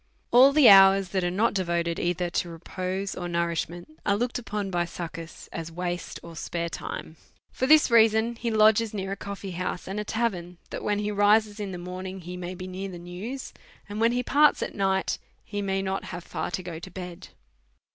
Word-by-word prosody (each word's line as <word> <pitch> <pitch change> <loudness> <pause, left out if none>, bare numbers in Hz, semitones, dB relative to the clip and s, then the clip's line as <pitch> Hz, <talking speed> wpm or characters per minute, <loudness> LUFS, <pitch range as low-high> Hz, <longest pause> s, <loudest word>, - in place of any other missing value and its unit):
All 255 +3 +8
the 285 -3 +6
hours 195 -1 +8
that 190 0 -1
are 175 - +1
not 200 +6 +1
devoted 170 -3 -1
either 175 0 -1
to 175 - -1
repose 185 +3 -4
or 175 - -5
nourishment 170 -1 -3
are 200 - +2
looked 245 +3 -1
upon 210 -4 -4
by 175 -1 +1
Succus 165 -1 -7
as 165 -1 -5
waste 175 +1 -4
or 170 -1 -10
spare 170 +2 -3
time; 160 -1 -6 0.3
for 260 - -1
tiiis 305 -3 +6
reason 225 0 +4
he 235 0 -3
lodges 220 0 +4
near 190 -1 -3
a - - -1
coffee 200 -1 -6
house 180 0 -3
Pud 195 +2 -4
a - - -1
tavern, 190 -6 -2
that - - -5
when 205 -1 +1
he 210 0 -1
rises 210 +1 +3
in 200 -2 -4
the 180 - -5
morning 185 +2 -6
he 180 +1 -7
may 180 0 -5
hear 185 +1 -5
the 180 - -8
news, 185 +10 -7 0.3
and 205 +2 -5
when 230 +1 +4
he 250 0 0
parts 295 +3 +4
at - - -5
night 190 -1 0 0.3
he 205 -1 -4
may 195 -1 -1
not 190 0 -2
have 175 -1 -7
far - - -4
to 175 -1 -5
bed. 180 0 -8
190 Hz, 195 wpm, -26 LUFS, 175-210 Hz, 0.3 s, All